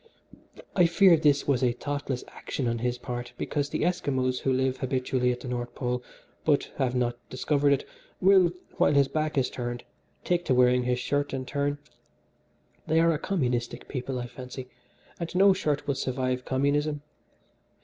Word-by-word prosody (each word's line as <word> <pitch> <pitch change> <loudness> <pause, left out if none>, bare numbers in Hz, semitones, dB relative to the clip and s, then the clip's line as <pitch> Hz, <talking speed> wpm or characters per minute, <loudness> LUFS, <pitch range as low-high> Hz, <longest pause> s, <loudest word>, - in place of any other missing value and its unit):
I 180 -3 +5
fear 170 +1 +6
this 145 -3 +2
was 135 -2 +2
a 120 -1 +3
thoughtless 140 0 -3
action 130 - -4
on 115 0 -1
his 125 +1 -1
part 120 0 -6
because 145 -1 -2
the - - -1
Esquimos 130 -7 0
who 135 - 0
live 130 0 +1
habitually 130 -1 0
at 125 - -4
the - - -7
North 120 -1 -4
Pole, 125 0 -2 0.4
but 145 -2 +1
have 130 -2 0
not 120 -1 0
discovered 145 +2 +1
it, 140 - +1 0.3
will, 190 -2 +5 0.3
while 145 - +3
his 140 -1 +5
back 155 0 -2
is 130 -2 +1
turned, 120 -1 -4 0.4
take 175 -1 +1
to 130 - +2
wearing 125 0 +4
his 125 0 +1
shirt 145 +2 -1
in 130 -1 -4
turn. 145 +1 -1 1.1
They 160 +1 +3
are 165 0 +4
a 150 - -2
communistic 125 -11 -2
people, 130 -1 -4
I 120 - -3
fancy, 125 +1 -8 0.5
and 170 0 -5
no 195 +1 +6
shirt 150 -6 -1
will 140 - +1
survive 130 -1 -2
communism. 145 +2 0
130 Hz, 170 wpm, -27 LUFS, 125-145 Hz, 1.1 s, fear